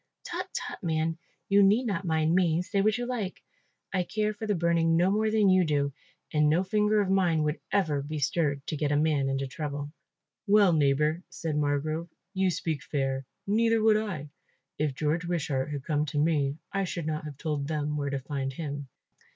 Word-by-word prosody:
"Tut, - - -4
tut, - - -4
man, 160 -2 -1 0.3
you 200 0 +5
need 210 +6 +4
not 200 -4 -2
mind 160 -1 +2
me, 175 -2 +3
say 200 +2 0
what 215 +2 +2
you 245 - -2
like. 235 -7 -4 0.5
I 185 - +2
care 210 +3 -1
for 215 +1 -6
the 205 - +1
burning 165 -1 +2
no 180 +3 +3
more 215 +1 +2
than 215 -2 +3
you 185 -1 +5
do 145 -3 0 0.4
and 150 -1 +4
no 165 +5 +3
finger 210 +2 +2
of 190 -2 0
mine 175 -5 +3
would 150 +1 -1
ever 160 -8 +1
be 150 +2 -5
stirred 145 -1 0
to - - -3
get 150 -1 -1
a - - +2
man 145 -2 +2
into 135 0 -1
trouble." 145 +1 -5 0.6
"Well, 200 -3 +5
neighbour," 150 +2 +2
said 160 -2 -4
Margrove, 150 +3 -1 0.2
"you 190 -1 +2
speak 160 -4 -2
fair, 135 -2 -2 0.2
neither 225 +2 +3
would 220 0 +5
I. 185 -10 -3 0.5
If 150 -3 0
George 155 +5 0
Wishart 150 -6 -1
had 145 -2 -4
come 150 0 0
to 145 - -4
me 145 -2 +1 0.2
I 195 0 +1
should 170 -3 -4
not 155 0 -3
have 145 -3 -7
told 145 -2 -2
them 150 -1 -1
where 140 -1 -1
to 140 - -1
find 135 0 -3
him." 145 -1 -5
160 Hz, 200 wpm, -28 LUFS, 145-190 Hz, 0.6 s, you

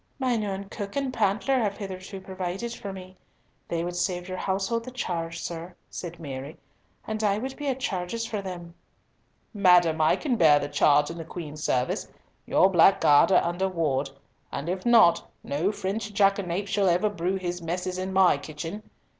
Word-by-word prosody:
"Mine 245 -5 0
own 195 -1 -3
cook 200 -1 -6
and 275 -2 -1
pantler 220 +4 +1
have 205 -4 -1
hitherto 190 -1 -7
provided 190 +4 -4
for 200 -4 -6
me. 185 -1 -10 0.5
They 170 0 -2
would 175 0 -4
save 180 0 -1
your 185 -1 -5
household 195 +4 -1
the 255 - -7
charge, 170 -9 -4
sir," 170 +1 -6 0.2
said 175 -1 -7
Mary, 140 -1 -7 0.5
"and 220 0 -3
I 200 -1 +2
would 260 +4 -4
be 290 - -5
at 265 -1 -1
charges 210 0 -2
for 215 -3 -3
them." 175 -3 -7 0.8
"Madam, 180 -5 +4
I 155 - +4
can 260 -6 -1
bear 155 -6 +6
the 145 - -2
charge 145 +1 +3
in 170 - -8
the - - -4
Queen's 155 -2 -7
service. 125 0 0 0.4
Your - - +5
black 190 +1 +5
guard 145 +6 +5
are - - +5
under 175 +3 -1
ward. 145 -6 0 0.4
And 145 +5 -4
if 185 +5 -3
not, 225 -8 +5
no 160 +8 0
French 210 +1 -3
jackanapes 195 -1 +1
shall 200 -3 +3
ever 180 +4 +2
brew 185 -2 -1
his 175 -2 -3
messes 180 +2 -3
in 190 +1 -3
my 190 -6 +4
kitchen! 160 +7 -6
185 Hz, 180 wpm, -26 LUFS, 170-205 Hz, 0.8 s, bear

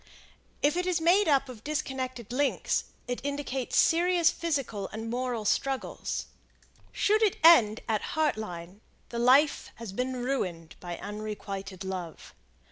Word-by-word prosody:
If 290 +2 +3
it 360 0 0
is 360 -2 +1
made 360 +5 +4
up 275 -2 +3
of 235 -4 -10
disconnected 260 -6 -4
links, 280 +1 0 0.2
it 245 +1 -4
indicates 280 -3 -2
serious 345 0 +4
physical 275 - -2
and 225 +1 -6
moral 245 -3 -2
struggles. 270 +5 -1 0.7
Should 425 +2 +2
it 425 -4 +3
end 230 -11 +7
at 215 -2 +1 0.2
Heart 310 -2 +3
Line, 180 -1 -7 0.3
the 235 - -4
life 265 +5 +4
has 230 -4 -7
been 255 +4 -2
ruined 180 -11 -3
by 175 -1 -6
unrequited 200 -2 -6
love. 185 -4 -6
250 Hz, 135 wpm, -28 LUFS, 210-295 Hz, 0.7 s, end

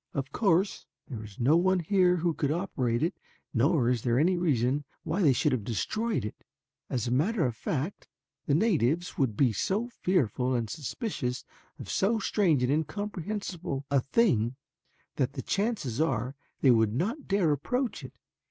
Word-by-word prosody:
Of 135 0 -3
course 195 -2 +1 0.2
there 115 -6 -6
is 105 -2 -12
no 135 +6 +4
one 185 +1 +3
here 180 +1 +3
who 170 -1 0
could 145 -2 -1
operate 135 -9 -1
it 170 +4 +1 0.4
nor 135 +1 +3
is 125 -2 +1
there 120 0 +1
any 175 +7 +3
reason 145 -5 +1 0.2
why 170 +6 -1
they 150 -7 +5
should 145 +4 +2
have 125 -5 -1
destroyed 135 - -1
it. 105 - -8 0.5
As 125 -3 -1
a 120 - -2
matter 165 - +2
of 120 -3 -1
fact, 150 - -3 0.4
the 140 - +3
natives 170 - +1
would 120 -7 +1
be 125 -5 +3
so 205 - -1
fearful 130 - 0
and 115 -3 -2
suspicious 145 - -4 0.3
of - - -9
so 215 +4 +1
strange 180 - +2
and 125 - +2
incomprehensible 180 -2 -3
a 140 - +4
thing 130 - +2 0.6
that 130 +1 0
the 130 - -5
chances 195 - -1
are 130 -3 0 0.3
they 135 - +6
would 110 -2 +3
not 225 - -2
dare 195 -6 +2
approach 245 - -1
it. - - -9
150 Hz, 170 wpm, -29 LUFS, 125-190 Hz, 0.6 s, they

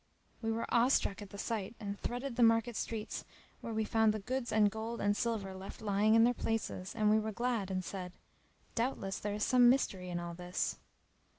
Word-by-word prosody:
[FN#307] 225 - -12
We - - +2
were 230 +1 -2
awe 235 +1 +5
struck 225 -5 +1
at 205 - -8
the 200 - -9
sight 220 0 -3
and 205 -2 -5
threaded 245 +1 -3
the 245 - 0
market 230 0 +4
streets 220 -1 -3 0.4
where 230 - -6
we 220 0 0
found 220 -1 +3
the - - 0
goods 250 +4 -3
and 210 -1 +4
gold 225 +2 -4
and 205 0 +2
silver 215 -4 -1
left 190 +5 -8
lying 215 0 +3
in 225 - +7
their 245 +1 +4
places; 225 -5 -3
and 215 -2 +3
we 215 - +5
were 220 0 -2
glad 235 -3 -1
and 185 -1 -2
said, 180 -2 -5 0.6
"Doubtless 230 -5 -1
there 205 0 -2
is 210 - -1
some 250 -1 +6
mystery 195 -8 +1
in 175 -1 -2
all 170 0 -5
this." 180 +1 -2
220 Hz, 215 wpm, -34 LUFS, 195-230 Hz, 0.6 s, in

